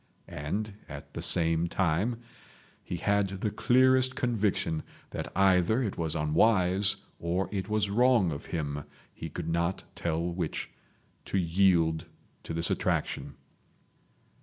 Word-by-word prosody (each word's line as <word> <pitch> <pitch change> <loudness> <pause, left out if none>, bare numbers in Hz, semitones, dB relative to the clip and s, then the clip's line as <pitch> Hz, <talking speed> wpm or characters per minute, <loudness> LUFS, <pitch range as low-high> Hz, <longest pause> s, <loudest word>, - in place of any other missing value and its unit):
And 100 +9 -4 0.2
at - - -9
the - - -5
same 80 0 +3
time 95 +8 0 0.6
he 90 - -4
had 100 +3 +2
the 105 - 0
clearest 130 +2 +3
conviction 105 -9 0 0.3
that - - -5
either 95 +5 +4
it 105 - -2
was 80 -2 -2
unwise 95 +5 +3 0.2
or 90 +3 -1
it 95 -1 -3
was 105 -2 +1
wrong 120 -5 +4
of 70 - -6
him—he 75 +1 -6
could 80 +2 -5
not 85 +3 0
tell 85 -1 -2
which—to 85 +3 -6
yield 85 -2 +2 0.3
to - - -8
this 85 0 0
attraction. - - -1
95 Hz, 120 wpm, -29 LUFS, 80-105 Hz, 0.6 s, either